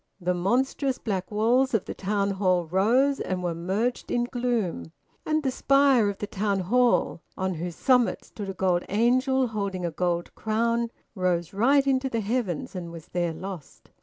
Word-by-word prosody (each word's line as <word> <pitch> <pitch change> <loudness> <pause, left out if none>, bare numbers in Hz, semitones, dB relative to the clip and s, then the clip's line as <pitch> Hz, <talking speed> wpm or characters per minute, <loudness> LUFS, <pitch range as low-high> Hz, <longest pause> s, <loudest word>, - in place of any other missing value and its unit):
The 180 0 0
monstrous 255 +8 0
black 190 -4 -3
walls 235 +4 +2
of 215 - 0
the - - -5
Town 200 0 -1
Hall 185 -3 +1
rose 235 - +2
and 185 -1 -3
were 175 -1 -1
merged 195 +9 -2
in 240 - +1
gloom; 235 - -2 0.3
and 310 0 +1
the 265 - +1
spire 275 -5 +4
of 200 - -5
the - - -3
Town 200 -1 -1
Hall, 240 -2 +2 0.2
on 190 0 -1
whose 170 +1 -5
summit 250 +1 +2
stood 205 -3 -7
a 195 - -5
gold 180 -1 +1
angel 255 +4 +2
holding 200 -4 -3
a 170 - -2
gold 175 +1 -2
crown, 230 +2 0 0.2
rose 180 -3 -1
right 270 +7 +3
into 265 -1 +1
the 230 -3 -1
heavens 210 -6 -2
and 170 -2 -5
was 165 -2 -11
there 175 -1 -1
lost. 180 -1 -9
205 Hz, 175 wpm, -26 LUFS, 180-245 Hz, 0.3 s, spire